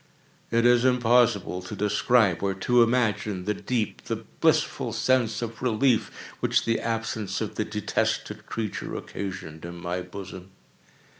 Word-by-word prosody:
It 115 +1 +2
is 120 0 +5
impossible 120 -6 +3
to 90 - -7
describe, 105 -2 +2
or 95 -1 0
to 120 +5 +3
imagine, 105 -5 +1
the 105 - +1
deep, 115 0 -3
the - - -1
blissful - - 0
sense 120 -4 +1
of 115 -1 -6
relief 120 -1 +2 0.3
which - - +1
the 115 0 +1
absence 115 -3 -2
of - - -3
the - - -2
detested - - -2
creature 110 -3 -4
occasioned 90 -5 -6
in 85 0 -7
my 85 +1 -3
bosom. 95 -1 -9
110 Hz, 140 wpm, -26 LUFS, 95-120 Hz, 0.3 s, is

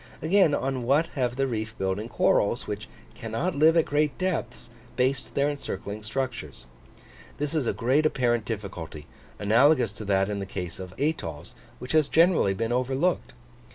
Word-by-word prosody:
Again, 160 0 +4
on 135 -1 -2
what 140 +7 +2
have 125 -3 -1
the 135 +1 +1
reef 110 -4 -4
building 95 +4 -2
corals, - - +2
which - - -5 0.3
cannot 115 +11 -3
live 160 +3 +5
at 165 - +4
great 150 0 0
depths, 145 -11 -3 0.2
based 125 -2 0
their 140 +1 +3
encircling 105 -7 -5
structures? 110 - -4 0.7
This 145 +1 -2
is 150 -7 0
a - - +3
great 135 +6 +2
apparent 120 -5 +1
difficulty, 95 -9 -6 0.3
analogous 115 +3 +4
to 105 +1 -9
that 95 -1 +2
in 105 -1 -3
the 100 - -5
case 90 -3 -5
of 95 0 -8
atolls, 110 - -2 0.2
which 125 - -7
has 155 -2 +4
generally 165 - +4
been 115 +3 -2
overlooked. 130 - 0
125 Hz, 160 wpm, -26 LUFS, 105-145 Hz, 0.7 s, live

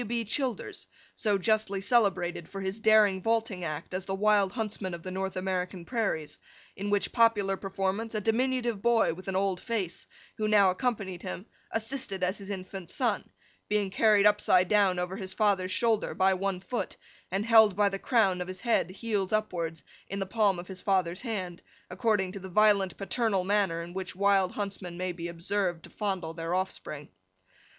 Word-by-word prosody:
W. 235 +1 -2
B. - - -14
Childers, 255 -2 -2 0.3
so 210 -3 +1
justly 210 0 +1
celebrated 190 -6 +1
for 195 - -6
his 190 +2 -3
daring 215 -3 +5
vaulting 225 -3 0
act 155 +1 -5
as 185 0 -3
the 195 - -1
Wild 205 -1 +3
Huntsman 210 -5 -3
of 170 - -11
the 185 - -5
North 190 +1 -3
American 185 -1 -2
Prairies; 200 -11 -2 0.4
in 200 +1 -4
which 205 -1 +1
popular 220 -5 +3
performance, 195 +3 -2
a - - +1
diminutive 235 0 0
boy 235 -5 +3
with 185 +3 -11
an 190 - -2
old 190 -1 0
face, 205 -8 -3 0.3
who 215 - 0
now 205 -3 +5
accompanied 195 -5 -2
him, 185 +1 -6 0.2
assisted 225 -4 -3
as 185 +3 0
his 200 0 -9
infant 190 -2 -6
son: 235 -6 -1 0.4
being 205 -2 +1
carried 210 0 +4
upside 195 -3 +4
down 200 -3 +3
over 180 +2 -3
his 190 -2 -5
father's 195 -3 +1
shoulder, 225 0 +1
by 190 +1 +4
one 190 0 -2
foot, 240 +5 -4 0.3
and 195 +3 -1
held 220 -4 +6
by 205 0 +3
the 195 0 -2
crown 195 -8 +2
of 180 - -4
his 185 0 -6
head, 235 -6 +1
heels 200 0 -2
upwards, 170 -7 -1 0.2
in 195 - -5
the 195 - -1
palm 200 -1 +2
of 175 +1 -7
his 185 -1 -7
father's 185 -3 0
hand, 190 -8 -4 0.3
according 210 -6 +1
to 200 - -7
the 190 0 -8
violent 200 -2 +3
paternal 200 -1 0
manner 190 -4 +1
in 175 +1 -9
which 190 -2 -5
wild 195 -1 +3
huntsmen 195 -4 -5
may 185 0 -2
be 170 -1 -6
observed 175 0 -2
to - - -13
fondle 190 -6 -3
their 165 +1 -2
offspring. 170 -6 -4
195 Hz, 185 wpm, -29 LUFS, 185-215 Hz, 0.4 s, held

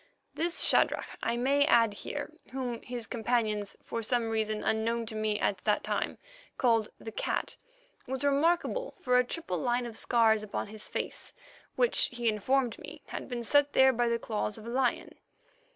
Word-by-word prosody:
This 335 +1 0
Shadrach, - - +2 0.2
I 235 - 0
may 275 +4 +3
add 230 -8 +4
here, 290 +8 -5 0.2
whom 250 -3 -3
his 245 -2 -5
companions, 220 -4 -1
for 230 - -4
some 230 0 0
reason 215 -1 -1
unknown 230 +1 0
to 220 - -6
me 215 -1 0
at 195 - 0
that 210 - +2
time, - - -2 0.4
called 230 -4 +2
the 225 - -8
Cat, - - -2 0.5
was 265 +1 -3
remarkable 335 - +1
for 250 0 +3
a - - +4
triple 245 - -4
line 245 +6 0
of 235 -2 -7
scars 225 -3 +3
upon 210 -1 -4
his 215 0 -8
face, - - -4 0.4
which, - - +4
he 240 -1 -2
informed 235 +3 +1
me, - - -10
had - - -6
been 240 -2 -3
set 290 +5 +3
there 265 0 +6
by 240 0 +1
the 235 - +1
claws 215 -2 -2
of 220 - -11
a 235 - -5
lion. 255 -1 0
235 Hz, 175 wpm, -30 LUFS, 220-260 Hz, 0.5 s, there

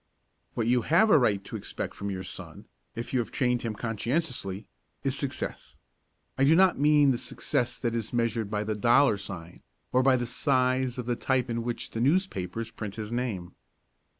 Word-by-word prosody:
What 115 - 0
you 120 +1 +3
have 175 - +4
a 155 - +7
right 100 -6 +2
to - - -8
expect - - -4
from 100 - -5
your 95 -1 -4
son, 90 - -8 0.3
if 115 +3 -5
you 130 - +3
have 120 - -2
trained 125 -2 0
him 115 -2 -3
conscientiously, 115 - -2 0.4
is - - 0
success. - - -4 0.6
I - - +4
do 150 +4 +6
not 185 -3 +4
mean 145 -1 +5
the 120 - -1
success 120 - -1
that 120 -2 0
is 115 -2 -3
measured 115 -3 0
by 105 0 -1
the 110 0 -2
dollar 120 +3 +4
sign, 85 -3 -8 0.3
or 130 - +4
by 130 0 +5
the 120 -1 -1
size 130 +1 +1
of 125 - -4
the 120 0 0
type 130 -1 0
in 115 0 -1
which 120 0 -4
the 115 - -3
newspapers 115 - 0
print 105 -4 -6
his 110 -1 -5
name. 110 -8 -3
120 Hz, 190 wpm, -28 LUFS, 110-130 Hz, 0.6 s, a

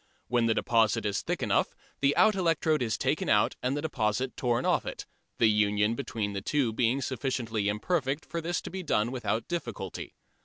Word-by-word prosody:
When 120 -1 +2
the 110 - +2
deposit 115 -1 +2
is 100 - 0
thick - - -3
enough - - +1 0.2
the 140 +1 +3
out 215 - +6
electrode 165 -5 +1
is 110 -3 0
taken - - 0
out - - +3
and 130 +3 0
the 145 - -3
deposit 125 -3 -1
torn 120 -2 0
off - - +2
it, - - -6 0.3
the - - +4
union 105 0 +2
between 115 -5 -3
the 100 - -3
two 130 0 0
being 125 +4 +1
sufficiently 120 -5 -1
imperfect 135 +6 -1
for 170 - -4
this 170 +1 -2
to - - -8
be 190 +1 -4
done 120 -8 0
without 120 -3 -2
difficulty. 115 - -5
120 Hz, 190 wpm, -29 LUFS, 110-145 Hz, 0.3 s, out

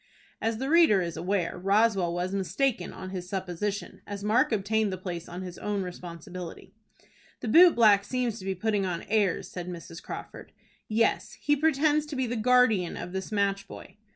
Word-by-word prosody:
As 225 0 0
the 265 - -3
reader 310 - +5
is 170 -1 -4
aware, 180 +1 -1
Roswell 195 -2 +2
was 180 +2 -2
mistaken 200 +1 -1
in 185 0 -8
his 180 -2 -6
supposition, 190 +1 -4
as 200 0 -6
Mark 225 +6 +3
obtained 215 0 +1
the 185 - -3
place 175 -2 -6
on 180 +2 -6
his 180 -1 -8
own 205 -2 -2
responsibility. 180 +1 -8 0.7
"The - - -4
boot 340 +9 +7
black 210 -4 +6
seems 240 0 -2
to 190 - -9
be 190 0 -1
putting 205 +1 0
on 180 -3 -3
airs," 205 -4 +1
said 180 -1 -6
Mrs. 165 -1 -8
Crawford. - - -9 0.3
"Yes, 225 +1 +1
he 290 - +1
pretends 300 0 +2
to 300 - -6
be 260 -1 0
the 240 0 -3
guardian 225 -6 +3
of 180 - -6
this 190 +3 -5
match 200 -1 0
boy." - - -11
200 Hz, 180 wpm, -28 LUFS, 180-225 Hz, 0.7 s, boot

